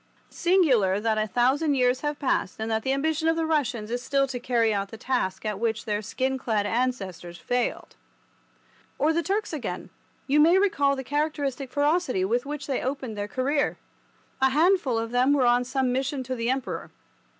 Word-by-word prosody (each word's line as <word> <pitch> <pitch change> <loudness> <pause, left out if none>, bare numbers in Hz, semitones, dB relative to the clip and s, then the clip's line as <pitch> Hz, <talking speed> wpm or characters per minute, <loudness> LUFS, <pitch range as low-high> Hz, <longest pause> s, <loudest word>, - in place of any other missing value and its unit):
Singular 265 - +3
that 220 0 0
a 215 - 0
thousand 265 - +2
years 250 -1 +2
have 295 -1 -2
passed 260 -9 -1
and 220 +1 -3
that 220 0 +1
the 265 - -1
ambition 315 +3 0
of 325 - +3
the 325 0 0
Russians 245 -9 -1
is 245 0 -2
still 275 +2 +1
to 250 -1 -4
carry 235 -3 +1
out 200 -1 -2
the 225 - -9
task 220 -6 -2
at 210 -2 -2
which 225 -1 -1
their 210 -1 -1
skin 260 +5 -2
clad 215 -5 0
ancestors 200 -7 -2
failed. 245 +5 -2 1.0
Or 310 +2 +2
the 335 - +1
Turks 400 +3 -2
again; 295 -5 -5 0.3
you 285 +2 +2
may 330 +5 +6
recall 285 -8 +2
the 265 - -5
characteristic 285 -2 -2
ferocity 290 - +1
with 240 +6 0
which 290 -1 -5
they 270 -2 -2
opened 260 -4 -4
their 205 0 -3
career. 275 +6 0 0.6
A 265 - +5
handful 310 -3 +2
of 225 0 -3
them 250 +3 +3
were 275 -3 +3
on 245 +1 +4
some 260 0 0
mission 265 +1 -1
to 255 +1 -4
the 230 0 -2
Emperor. 260 0 -3
260 Hz, 190 wpm, -26 LUFS, 230-290 Hz, 1.0 s, may